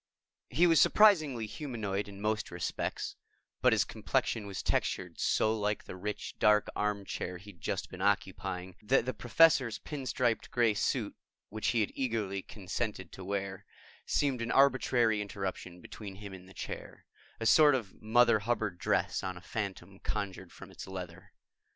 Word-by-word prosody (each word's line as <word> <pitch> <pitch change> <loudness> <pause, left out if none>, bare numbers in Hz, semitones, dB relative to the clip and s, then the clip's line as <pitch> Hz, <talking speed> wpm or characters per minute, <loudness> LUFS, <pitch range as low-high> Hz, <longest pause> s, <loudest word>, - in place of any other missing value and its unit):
He 165 +8 +4
was 165 -2 +6
surprisingly 155 - +5
humanoid 105 -6 -3
in 100 -1 -10
most 105 +1 -1
respects, 85 -2 -3 0.5
but - - +5
his - - +4
complexion 105 -3 -1
was 100 - -5
textured - - -1
so 110 +1 +2
like 105 -1 -1
the - - -8
rich 105 +3 -5
dark 105 0 +4
armchair 100 -3 -2
he'd 95 -1 -14
just - - -2
been 95 - -8
occupying 95 -2 -1
that 120 +3 +2
the 130 - -1
Professor's 130 -2 +4
pin 140 -4 -6
striped 120 -2 0
gray 120 -3 +3
suit, 105 - -1 0.3
which 110 0 -3
he 115 - +3
had 105 - 0
eagerly 110 -7 -1
consented 100 -1 -4
to 95 - -9
wear, 100 0 -3 0.4
seemed 135 -4 +1
an 115 - -2
arbitrary 125 -5 +4
interruption 95 -3 -5
between 100 -3 -9
him 100 0 -9
and 95 0 -11
the 95 - -15
chair - - -7 0.3
a 115 - -3
sort 145 +4 +7
of 110 -7 -5
Mother 115 +1 +5
Hubbard 105 -4 -1
dress - - +1
on 95 -1 -4
a - - -8
phantom 95 -1 -5
conjured 95 -4 -4
from - - -12
its - - -9
leather. 90 0 -8
105 Hz, 160 wpm, -31 LUFS, 95-120 Hz, 0.5 s, sort